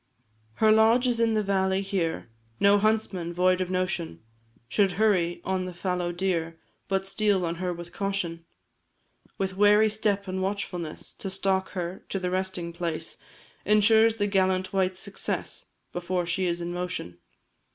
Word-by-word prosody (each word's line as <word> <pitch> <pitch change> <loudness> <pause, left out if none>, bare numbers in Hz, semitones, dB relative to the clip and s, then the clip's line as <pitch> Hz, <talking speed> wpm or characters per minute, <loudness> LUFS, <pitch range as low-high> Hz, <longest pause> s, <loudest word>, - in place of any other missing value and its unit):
Her 220 - +4
lodge 225 +3 +5
is 240 -2 +2
in 225 -1 +2
the 215 - +2
valley 190 -1 +1
here 180 - -2 0.3
No 200 +1 +5
huntsman, 205 -5 0
void 185 +1 +2
of 180 - -2
notion, 185 - -2 0.5
Should 195 - +2
hurry 185 -5 +2
on 190 -1 -1
the 180 -1 -7
fallow 180 -1 -1
deer, 170 -2 -1 0.3
But 195 0 0
steal 200 -2 +1
on 165 0 -3
her 180 0 -2
with 175 0 -8
caution; 185 -4 -2 0.9
With 190 -1 -2
wary 210 +2 +5
step 205 -2 0
and 190 0 -2
watchfulness 185 -4 -4
To 195 - -6
stalk 190 0 0
her 175 +1 -4
to - - -2
her 180 -1 -2
resting 185 -2 -2
place, 165 -2 -3 0.5
Insures 220 +2 +5
the 205 - 0
gallant 190 -2 +1
wight's 190 -1 +1
success, 200 +1 -4 0.3
Before 175 0 -1
she 180 +2 0
is 170 0 -1
in 170 0 -3
motion. 175 - -4
190 Hz, 155 wpm, -27 LUFS, 175-200 Hz, 0.9 s, lodge